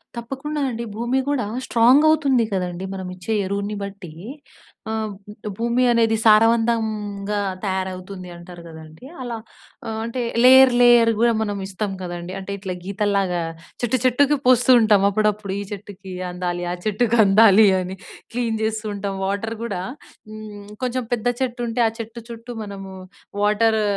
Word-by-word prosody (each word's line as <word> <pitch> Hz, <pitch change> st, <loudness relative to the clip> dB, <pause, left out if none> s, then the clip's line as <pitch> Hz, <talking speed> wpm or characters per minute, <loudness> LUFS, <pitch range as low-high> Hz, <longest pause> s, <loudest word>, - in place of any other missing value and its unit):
తప్పకుండా 270 Hz, +5 st, -4 dB
అండి. 235 Hz, -1 st, -4 dB
భూమి 240 Hz, +4 st, 0 dB
గూడా 285 Hz, -6 st, 0 dB, 0.2 s
స్ట్రాంగ్ 245 Hz, +5 st, +5 dB
అవుతుంది 280 Hz, -6 st, +3 dB
కదండీ. 180 Hz, -1 st, -3 dB
మనమిచ్చే 185 Hz, +2 st, -5 dB
ఎరువుని 200 Hz, +2 st, -3 dB
బట్టి. 200 Hz, -4 st, -8 dB, 0.8 s
ఆహ్, 220 Hz, -1 st, -2 dB, 0.2 s
బ్ 210 Hz, +1 st, -10 dB
భూమి 235 Hz, +2 st, +1 dB
అనేది 225 Hz, -1 st, +3 dB
సారవంతంగా 215 Hz, -2 st, +2 dB, 0.2 s
తయారవుతుంది 185 Hz, -1 st, -4 dB
అంటారు 175 Hz, 0 st, -11 dB
గదండీ 160 Hz, +5 st, -12 dB, 0.2 s
అలా. 240 Hz, -2 st, -4 dB, 0.5 s
ఆహ్ 220 Hz, 0 st, -3 dB
అంటే 235 Hz, +2 st, -3 dB, 0.2 s
లేయర్, 260 Hz, +1 st, +8 dB
లేయర్ 240 Hz, -1 st, +6 dB
గూడా 235 Hz, +1 st, +4 dB
మనం 205 Hz, -2 st, -2 dB
ఇస్తాం 200 Hz, +1 st, -4 dB
కదండీ. 175 Hz, 0 st, -6 dB
అంటే 195 Hz, +1 st, -7 dB
ఇట్లా 190 Hz, -2 st, -5 dB
గీతల్లాగా 200 Hz, -2 st, 0 dB, 0.4 s
చెట్టు 240 Hz, +2 st, +1 dB
చెట్టుకి 280 Hz, +4 st, +3 dB
పోస్తూ 250 Hz, -1 st, +4 dB
ఉంటాం 210 Hz, -3 st, +4 dB
అప్పుడప్పుడు. 210 Hz, -1 st, 0 dB
ఈ -, -, -3 dB
చెట్టుకి 200 Hz, -1 st, -9 dB, 0.2 s
అందాలి 175 Hz, 0 st, -3 dB
ఆ -, -, -1 dB
చెట్టుకి 220 Hz, +2 st, +1 dB
అందాలి 210 Hz, +1 st, +6 dB
అని, 185 Hz, +1 st, -5 dB, 0.4 s
క్లీన్ 230 Hz, -2 st, -1 dB
జేస్తూ 220 Hz, 0 st, -2 dB
ఉంటాం. 200 Hz, -1 st, -4 dB
వాటర్ 205 Hz, +3 st, -2 dB
గూడా 200 Hz, -6 st, -3 dB, 0.5 s
హ్మ్. 215 Hz, -2 st, -10 dB, 0.2 s
కొంచెం 255 Hz, 0 st, -1 dB
పెద్ద 240 Hz, 0 st, -1 dB
చెట్టు 250 Hz, -1 st, -2 dB
ఉంటే 230 Hz, +1 st, -1 dB
ఆ -, -, +1 dB
చెట్టు 230 Hz, +1 st, -7 dB
చుట్టూ 230 Hz, +1 st, -9 dB
మనము 195 Hz, -2 st, -8 dB, 0.5 s
వాటరు 215 Hz, +1 st, +2 dB
215 Hz, 145 wpm, -22 LUFS, 195-235 Hz, 0.8 s, లేయర్